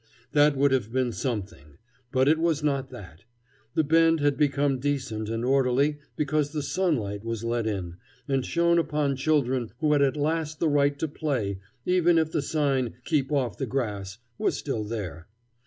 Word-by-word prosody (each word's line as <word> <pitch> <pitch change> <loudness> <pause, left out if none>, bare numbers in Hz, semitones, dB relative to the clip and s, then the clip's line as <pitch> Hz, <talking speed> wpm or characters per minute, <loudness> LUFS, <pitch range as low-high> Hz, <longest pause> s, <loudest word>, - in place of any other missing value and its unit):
That 145 -1 +4
would 140 0 +3
have 120 -5 0
been 130 -1 0
something; 100 - -5 0.3
but 130 +1 +2
it 155 +2 +4
was 160 -2 +1
not 140 -3 0
that. 95 -7 -12 0.5
The 160 - +3
Bend 165 +2 +4
had 145 -1 +2
become 140 -2 +1
decent 125 -6 -2
and 115 +1 -2
orderly 135 +3 +2 0.2
because 150 0 0
the 150 -2 -2
sunlight 120 - -1
was 115 -1 -4
let 115 -1 -1
in, 90 -5 -4 0.3
and 135 -2 +1
shone 170 +4 +2
upon 150 -4 0
children 130 -4 +1
who 150 +2 +2
had 145 - +3
at 140 +1 +2
last 155 0 -1
the 165 - +2
right 145 -1 +2
to 160 - -1
play, 125 -11 -2 0.3
even 175 -2 +3
if 160 -1 +1
the 155 - 0
sign 140 -5 0
"keep 150 -4 0
off 135 -5 -1
the 135 - -2
grass" 105 -6 -3 0.2
was - - +1
still 125 -7 -3
there. 100 -6 -6
140 Hz, 175 wpm, -26 LUFS, 115-150 Hz, 0.5 s, That